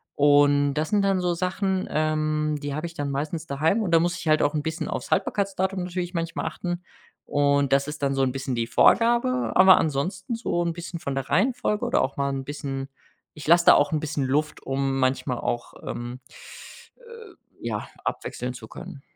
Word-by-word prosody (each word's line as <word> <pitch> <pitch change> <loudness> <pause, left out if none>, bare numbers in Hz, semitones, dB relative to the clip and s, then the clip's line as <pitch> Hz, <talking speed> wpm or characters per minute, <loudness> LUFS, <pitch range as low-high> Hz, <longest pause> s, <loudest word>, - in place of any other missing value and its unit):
und 145 0 +4
das 155 +1 -1
sind 205 -1 +2
dann 195 -1 +2
so 175 -1 +1
Sachen, 185 +2 -1
ähm, 155 -1 0
die 145 -1 -4
habe 155 +3 -3
ich 170 - -6
dann 145 -4 -3
meistens 155 +4 -3
daheim 160 +10 +1
und 205 - -1
da 165 - +6
muss 175 +2 0
ich - - -7
halt 155 0 +4
auch 145 - +1
'n 150 - 0
bisschen 160 +1 -3
aufs - - -4
Haltbarkeitsdatum 195 -1 0
natürlich 180 0 -4
manchmal 165 -1 -3
achten 175 +2 -4 0.4
und 140 -1 +2
das 140 +1 +2
ist 150 -1 -6
dann 140 - +1
so 135 - 0
'n 130 -1 +2
bisschen 135 0 -4
die 115 -1 -1
Vorgabe, 240 - +3
aber 185 0 +8
ansonsten 180 - -1
so 220 -6 -1
'n 170 -1 -1
bisschen 170 0 -7
von 140 -3 -4
der 135 -1 -4
Reihenfolge 210 - +1
oder - - +2
auch 135 - -3
mal 140 0 0
'n 135 -1 -3
bisschen 135 -1 -5 0.5
ich 150 -2 -10
lasse 170 +1 +5
da - - +9
auch 145 - +3
'n 155 - +1
bisschen 145 -3 -2
Luft, 150 +4 -1
um 135 0 -1
manchmal 130 -1 0
auch, 120 - -3
ähm, 120 +1 -5 0.8
äh, 465 -5 -13 0.3
ja, 110 -3 -3 0.2
abwechseln 125 0 -4
zu 120 -3 -10
können. 135 - -10
155 Hz, 200 wpm, -25 LUFS, 140-180 Hz, 0.8 s, da